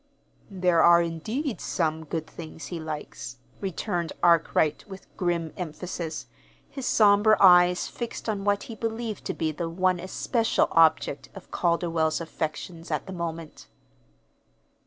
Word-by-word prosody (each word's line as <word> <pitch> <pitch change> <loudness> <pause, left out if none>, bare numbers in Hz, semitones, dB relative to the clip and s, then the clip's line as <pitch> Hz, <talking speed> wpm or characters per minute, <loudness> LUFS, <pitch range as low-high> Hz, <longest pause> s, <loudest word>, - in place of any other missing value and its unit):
"There 180 -4 +2
are, 170 0 +7
indeed, 215 - -3
some 160 -2 -1
good 160 +1 -3
things 160 0 -9
he 170 - -3
likes," 150 -5 -7 0.2
returned 180 -3 -3
Arkwright, 165 -2 +3
with 190 0 -10
grim 170 -3 -1
emphasis, 165 0 -5 0.4
his 270 -3 -6
somber 210 0 +5
eyes 180 -1 +6
fixed 235 -1 -6
on 205 -3 -2
what 205 0 +1
he 230 - -8
believed 225 -1 -4
to - - -3
be 160 -1 -1
the 165 +2 -4
one 185 +1 +1
especial 225 +5 0
object 160 -4 +3
of 195 - -12
Calderwell's 170 -2 +1
affections 165 +1 -5
at - - -2
the 190 - -7
moment. 165 -2 -6
175 Hz, 135 wpm, -26 LUFS, 160-195 Hz, 0.4 s, are